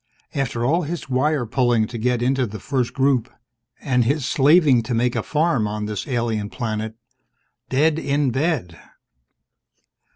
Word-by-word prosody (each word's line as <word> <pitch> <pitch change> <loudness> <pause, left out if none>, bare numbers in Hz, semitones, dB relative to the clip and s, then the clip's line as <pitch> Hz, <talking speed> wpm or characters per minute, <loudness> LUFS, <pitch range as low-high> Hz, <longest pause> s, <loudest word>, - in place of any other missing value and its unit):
After 125 -4 -1
all 165 +7 +2
his 165 -2 -5
wire 135 +1 +1
pulling 120 -1 +2
to 115 +1 -7
get 120 +1 0
into 130 0 +1
the 110 0 -8
First 130 +2 -1
Group, 130 -3 +1 0.5
and 125 -3 +1
his 140 +3 0
slaving 140 -1 +4
to 115 +1 -3
make 120 +1 +1
a - - 0
farm 150 -8 +1
on 105 0 -3
this 105 -1 -4
alien 115 -5 -1
planet, 110 -2 -4 0.7
dead 150 +4 +2
in 140 -2 0
bed! 130 - -1
125 Hz, 150 wpm, -22 LUFS, 115-140 Hz, 0.7 s, slaving